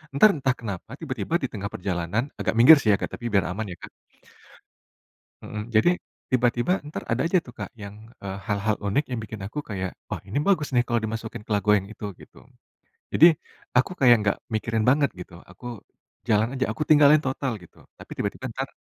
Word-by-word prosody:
Entar 215 +9 +7
entah 130 -3 0
kenapa, 105 -1 -6
tiba-tiba 135 -1 -3
di - - +1
tengah 100 -2 -4
perjalanan 90 +4 -1 0.2
agak - - 0
minggir 140 +7 +9
sih 110 - 0
ya, - - +5
Kak, - - -3
tapi 120 - -10
biar 100 -2 +3
aman, 110 +3 -3
ya, - - -6
Kak - - -9 1.5
Mhm. 105 -3 -5
Jadi, 110 +11 +5 0.4
tiba-tiba 120 +4 +2
entar 150 - -6
ada 115 +2 +1
aja 185 +2 +3
tuh 120 - -11
Kak, - - -5
yang, 100 0 -8 0.3
eee, 95 0 -4
hal-hal 105 0 0
unik 140 +10 +1
yang 120 -3 -2
bikin 110 -1 -8
aku 150 - -7
kayak, 95 -3 -3 0.2
"Wah, - - -3
ini 110 - -1
bagus 155 -7 +2
nih 120 - +5
kalau 120 -1 +1
dimasukin 110 -1 -5
ke - - -18
lagu 105 +1 +1
yang 95 -1 -2
itu." 105 - -10 0.2
Gitu. - - -16 0.7
Jadi, 165 - +8 0.5
aku 130 - +2
kayak 125 -3 +7
nggak 100 -1 +1 0.2
mikirin 110 0 0
banget 140 +2 +4
gitu, 90 - -10 0.2
aku 95 +7 -17 0.6
jalan 110 0 +3
aja, 130 0 0
aku 115 - -4
tinggalin 150 0 +7
total, 130 -1 -1
gitu. 85 - -18 0.2
Tapi - - -14
tiba-tiba - - -4
entar - - -4
115 Hz, 195 wpm, -25 LUFS, 100-130 Hz, 1.5 s, minggir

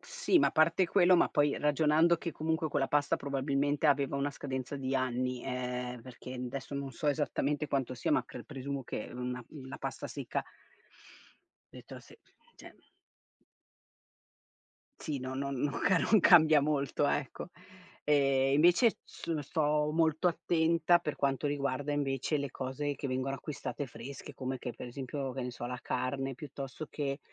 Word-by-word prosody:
Sì 485 -7 +1
ma - - +4
a - - -5
parte 165 +4 +3
quello, 180 0 +5
ma - - +4
poi 145 -1 +2
ragionando 155 +3 +4
che 170 0 -5
comunque 160 +1 -1
quella 140 -2 0
pasta 145 -1 +2
probabilmente 140 +2 0
aveva 140 -1 +2
una 140 +1 0
scadenza 130 0 -5
di 135 -1 -2
anni, 125 -1 -1
ehm, 125 -1 -3
perché 125 0 -10
adesso 130 +2 -5
non 140 -1 -3
so 150 - -5
esattamente 145 0 0
quanto 135 -2 -1
sia 120 - -2
ma - - +3
cre - - -9
presumo 140 -1 -5
che 120 - -5
una, 125 0 -4
mhmm, 135 -4 -10
la - - -7
pasta - - -4
secca - - -3 1.3
detto - - -10
se - - -17 0.4
cioè - - -13 2.3
Sì 145 -3 -3
no, 130 +1 -5
no, 140 +1 -2
non 140 +1 -2
ca 185 -2 +4
non 215 +4 +4
cambia 160 -4 +7
molto 145 0 0
ecco, 145 +5 -2 0.6
e 135 -2 +3
invece 175 - +6
s 165 - -5
sto 150 +1 +1
molto 160 +1 +3
attenta 170 0 +3
per 155 -3 -4
quanto 140 +1 0
riguarda 145 0 -1
invece 140 +1 0
le 140 -1 -3
cose 135 +3 -3
che 140 +1 -4
vengono 130 +1 -1
acquistate 145 +1 -5
fresche, 135 +4 -9
come 130 0 -4
che 125 - -5
per - - -8
esempio 135 +2 -4
che 130 0 -4
ne 125 - -3
so 120 0 -6
la 125 0 -4
carne 135 +1 -2
piuttosto 140 +2 -7
che, 140 -1 -3
140 Hz, 160 wpm, -32 LUFS, 130-150 Hz, 2.3 s, cambia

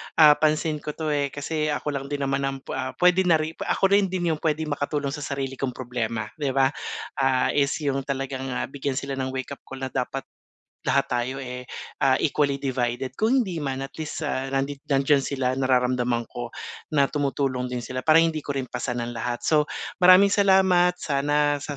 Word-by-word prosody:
ah, 150 -2 +8
pansin 155 0 +1
ko 150 0 -6
'to 155 -2 -2
eh. 145 -1 +1
Kasi 150 +2 -3
ako 150 0 -1
lang 140 -1 -4
din 145 0 -3
naman 135 0 0
ang, 135 0 -3
ah, 130 - -3
pwede 180 +1 +4
na 170 - +6
ri 155 0 -1
ako 195 - +1
rin 200 -1 +5
din 175 -2 -1
'yung 155 - -2
pwede 160 -1 0
makatulong 145 -1 -2
sa 150 - -5
sarili 135 -2 -4
kong 130 -3 -2
problema, 115 -3 -3
'di 140 -3 -1
ba? 135 0 +4 0.5
Ah, 135 -1 +2
is 140 0 +1
'yung 135 -1 -1
talagang, 135 -1 -3
ah, - - -1
bigyan 140 -1 -3
sila 135 0 -3
ng 130 0 -1
wake-up 130 +2 -5
call 135 0 -8
na 130 - -3
dapat 135 +1 -2 0.6
lahat 140 - +1
tayo 125 +2 -1
eh, 125 -1 -7 0.3
ah, 130 -1 +4
equally 140 -2 +1
divided. 130 -2 -2
Kung 235 - +2
hindi 175 -5 -4
man 135 -2 -3
at 135 - -9
least, 155 0 -4
ah, 135 -2 -2
nandi 135 +1 -2
nandiyan 140 0 +3
sila 130 -2 -1
nararamdaman 125 -2 +1
ko 120 0 -6 0.5
na 140 - +6
tumutulong 135 -3 -1
din 125 -1 -4
sila 130 0 -4
para 155 +4 +4
hindi 165 -1 +3
ko 140 -1 -5
rin 135 - -1
pasan 120 -1 -3
ang 120 - -5
lahat. 120 +1 -4
So 150 -1 +3 0.3
maraming 185 +2 +7
salamat 190 -3 +4
sana 145 -1 +1
sa 145 0 -5
140 Hz, 200 wpm, -25 LUFS, 130-150 Hz, 0.6 s, ah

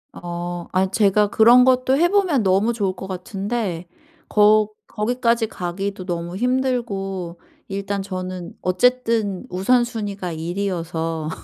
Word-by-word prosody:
아 175 0 -5
아니 190 0 +1
제가 205 0 +3
그런 235 +4 +6
것도 260 +1 +3
해 345 +3 +3
보면 365 - +2
너무 195 +5 +2
좋을 200 -5 -1
것 190 - -7
같은데 190 -1 -4 0.4
거 210 0 +4 0.2
거기까지 235 +1 0
가기도 195 +1 -4
너무 175 -1 -4
힘들고 200 -8 -2 0.3
일단 200 0 -3
저는 185 -2 -6
어쨌든 220 0 +1
우선순위가 205 -2 0
일이어서. 165 -2 -3
200 Hz, 255 characters per minute, -21 LUFS, 180-235 Hz, 0.4 s, 그런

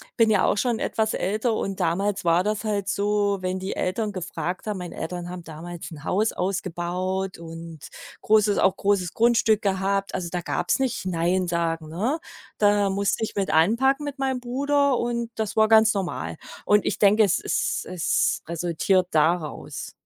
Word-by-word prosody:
bin 230 -1 +4
ja 210 -3 +3
auch - - +2
schon 235 +1 +1
etwas 220 0 -1
älter, 215 +4 0
und 195 0 -3
damals 190 +3 0
war 170 +1 +3
das 210 +1 -1
halt 200 -2 -1
so, 205 0 +1
wenn 185 0 -2
die 190 +1 -4
Eltern 210 +4 -1
gefragt 180 0 -5
haben 210 -2 -2
meine 180 -1 -7
Eltern 175 +1 -5
haben 180 -1 -7
damals 165 +2 -8
'n 150 -2 -10
Haus 210 +6 +1
ausgebaut 185 0 -2
und 165 -1 -9 0.4
großes 210 -1 +3
auch 190 0 +3
großes 195 -3 0
Grundstück 225 -2 +3
gehabt, 195 0 0
also 175 -2 -3
da 180 - -2
gab's - - 0
nicht 255 -7 -2
Nein 180 +1 0
sagen, 165 -2 -1
ne? 225 - -1 0.4
Da 205 -1 +3
musste 200 +3 0
ich 220 - -3
mit 195 -1 -1
anpacken 235 - +3
mit 285 -1 -6
meinem 265 -1 0
Bruder, 280 +2 +1
und 235 -1 -2
das 220 -2 -3
war 220 0 +5
ganz 220 0 +5
normal. 190 -3 -3 0.3
Und 210 -1 +3
ich - - -1
denke, 210 +2 +5
es 200 - +2
es - - -1
es 180 -2 0
resultiert 175 +2 +1
daraus. 160 0 -1
195 Hz, 175 wpm, -24 LUFS, 175-220 Hz, 0.4 s, war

